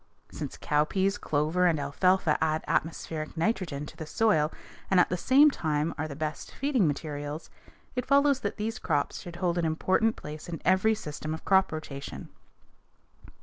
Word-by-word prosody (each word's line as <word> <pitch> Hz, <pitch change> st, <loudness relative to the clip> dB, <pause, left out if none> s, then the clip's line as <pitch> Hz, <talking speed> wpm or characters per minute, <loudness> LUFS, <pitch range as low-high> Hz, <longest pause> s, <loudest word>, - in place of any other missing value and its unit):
Since -, -, -6 dB
cowpeas, 190 Hz, +7 st, +1 dB
clover, 155 Hz, +5 st, +1 dB
and 160 Hz, -3 st, +2 dB
alfalfa 155 Hz, +3 st, +2 dB
add 155 Hz, 0 st, 0 dB
atmospheric 160 Hz, 0 st, -2 dB
nitrogen 165 Hz, -6 st, -1 dB
to -, -, -11 dB
the 160 Hz, -, -7 dB
soil 160 Hz, -7 st, +2 dB, 0.4 s
and 190 Hz, -, +4 dB
at -, -, +4 dB
the 180 Hz, -, 0 dB
same 275 Hz, -, +5 dB
time 155 Hz, -, -1 dB
are 155 Hz, +1 st, -3 dB
the 140 Hz, -, -7 dB
best 155 Hz, 0 st, -4 dB
feeding 265 Hz, -, +2 dB
materials, 145 Hz, +1 st, -4 dB, 0.4 s
it 250 Hz, 0 st, -2 dB
follows 280 Hz, 0 st, +4 dB
that 205 Hz, -, -3 dB
these 220 Hz, +1 st, -3 dB
crops 145 Hz, -3 st, -1 dB
should 175 Hz, -1 st, -9 dB
hold 175 Hz, 0 st, 0 dB
an 170 Hz, -, 0 dB
important 190 Hz, +7 st, +1 dB
place 150 Hz, +2 st, -8 dB
in 165 Hz, -3 st, -4 dB
every 190 Hz, +5 st, +4 dB
system 155 Hz, -5 st, -5 dB
of -, -, -11 dB
crop 190 Hz, -1 st, +4 dB
rotation. 145 Hz, -3 st, -7 dB
165 Hz, 165 wpm, -28 LUFS, 150-195 Hz, 0.4 s, same